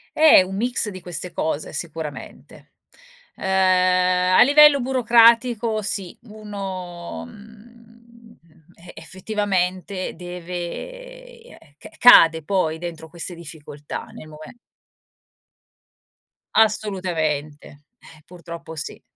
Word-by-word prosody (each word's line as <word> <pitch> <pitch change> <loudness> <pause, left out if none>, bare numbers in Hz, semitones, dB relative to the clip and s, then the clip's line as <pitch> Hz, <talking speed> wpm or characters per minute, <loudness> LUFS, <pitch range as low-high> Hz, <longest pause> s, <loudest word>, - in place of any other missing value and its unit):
Eh, 315 0 +7
è - - +5
un 190 +1 -5
mix 240 0 -1
di 185 -2 -9
queste 175 0 -6
cose, 160 -2 -4
sicuramente. 160 -2 -8 0.6
Uhm, - - -12
a 185 -1 +3
livello 290 +1 +6
burocratico, 235 -2 +3
sì. 195 -3 -5
uno, 195 -5 -8
mhmm, 230 +1 -17 0.7
e 175 +1 -14
effettivamente 190 -2 -3
deve 180 - -8
eh, 155 - -19
c - - -12
cade 165 -9 +7
poi, 160 -3 -1
dentro 165 -2 -8
queste 170 +1 -5
difficoltà, 150 -3 -9
nel 155 - -12
mome 155 +8 -13 2.0
Assolutamente, 175 -9 -1 0.3
eh, 155 -8 -18
purtroppo 170 -2 -10
sì, 150 - -6
185 Hz, 95 wpm, -21 LUFS, 170-225 Hz, 2.0 s, Eh